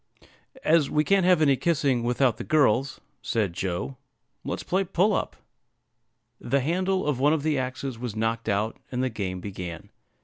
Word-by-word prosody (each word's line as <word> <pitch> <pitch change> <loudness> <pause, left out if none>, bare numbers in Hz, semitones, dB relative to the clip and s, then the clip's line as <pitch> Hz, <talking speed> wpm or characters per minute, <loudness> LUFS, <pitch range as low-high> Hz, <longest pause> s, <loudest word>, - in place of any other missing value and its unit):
"As 155 -3 +3
we 150 - +2
can't 195 +2 +3
have 180 -4 +5
any 140 -2 +4
kissing 140 -5 +1
without 120 0 +1
the - - -5
girls," 140 -2 +2 0.2
said 110 -7 -1
Joe, 95 +9 -3 0.5
"let's - - -4
play 190 +2 +1
'Pull 195 +3 +2
up.'" - - -2 1.0
The 140 0 0
handle 185 +6 0
of 145 -4 0
one 145 +3 +4
of 155 -3 -1
the 155 -3 +1
axes 130 -1 -4
was 120 -3 -5
knocked 115 0 -1
out, 105 +2 0
and 125 0 -1
the 130 - +1
game 95 -4 -4
began. 90 -4 -7
130 Hz, 170 wpm, -26 LUFS, 115-155 Hz, 1.0 s, have